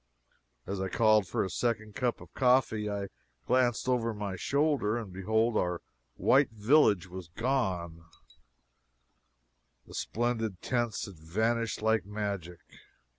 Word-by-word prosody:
As 100 -1 -3
I 95 - -1
called 110 -2 +4
for - - 0
a 95 - -3
second 110 +1 -1
cup 125 +2 -1
of - - -14
coffee, 125 -5 +2
I 100 -1 -3 0.4
glanced 125 -1 +2
over 115 -3 +1
my 100 -2 -4
shoulder, 140 - +1
and 105 -6 -6
behold 110 +4 +1
our 90 -3 0 0.4
white 140 +2 +4
village 110 - +3
was 90 -1 -8
gone 90 -6 -2 1.8
the - - -14
splendid 115 -4 -2
tents 120 -4 -1
had 95 -5 -11
vanished 110 +7 -1
like 110 0 +3
magic! 100 -4 -4
110 Hz, 125 wpm, -30 LUFS, 95-120 Hz, 1.8 s, called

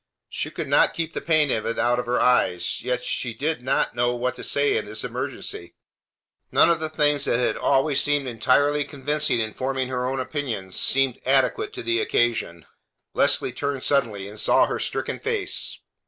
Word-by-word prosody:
She - - -3
could - - -5
not - - +3
keep 165 -1 -3
the - - -4
pain 155 -4 +2
of 110 - -1
it 115 - -2
out 120 0 +2
of 125 - -4
her 125 +1 +1
eyes; 125 -8 +2
yet 125 -1 -2
she 120 -2 -3
did 155 -2 -2
not 130 - 0
know 120 +1 0
what 125 +1 -1
to - - -8
say 145 0 +1
in - - -1
this 105 +1 -5
emergency. 85 - -5 0.8
None - - +5
of 170 - +1
the 160 0 -3
things 150 -2 +2
that - - +1
had 125 - 0
always 140 +1 +2
seemed 145 -2 +1
entirely 140 +5 +2
convincing 145 -1 -1
in 110 -1 -2
forming 130 0 -2
her 125 -1 -2
own 135 +1 -2
opinions 120 -10 -4
seemed 135 -2 +2
adequate 140 - +1
to 375 - -6
the 350 +3 +1
occasion. 115 - 0 0.5
Leslie - - +2
turned 140 -2 -3
suddenly, 110 -9 0
and 105 +1 -9
saw - - +4
her - - -3
stricken - - -3
face. 440 -2 -2
130 Hz, 190 wpm, -24 LUFS, 120-145 Hz, 0.8 s, None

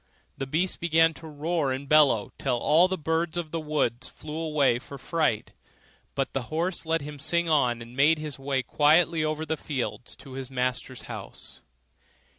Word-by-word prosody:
The 135 - -4
beast 170 +7 0
began 165 -1 +4
to 160 - -11
roar 155 -1 -1
and 135 +2 -4
bellow, 140 -8 +4
till 125 -3 0
all 160 +8 +4
the 190 0 -2
birds 160 +1 -1
of 165 -3 -3
the 165 - -2
wood 150 -6 -1
flew 150 +3 -5
away 150 -6 +2
for 140 +2 -10
fright; 155 -6 0 0.6
but 135 - -1
the 135 - -1
horse 170 +2 -2
let 165 0 +1
him 145 0 -8
sing 170 +4 +1
on, 125 -7 +2
and 120 +2 -13
made 150 +4 +5
his 150 -2 -6
way 135 -1 -1
quietly 155 +3 +3
over 155 0 -1
the 160 +1 -2
fields 130 -4 -4
to 135 - -13
his 130 0 -6
master's 130 0 -2
house. - - -9
150 Hz, 180 wpm, -27 LUFS, 135-160 Hz, 0.6 s, made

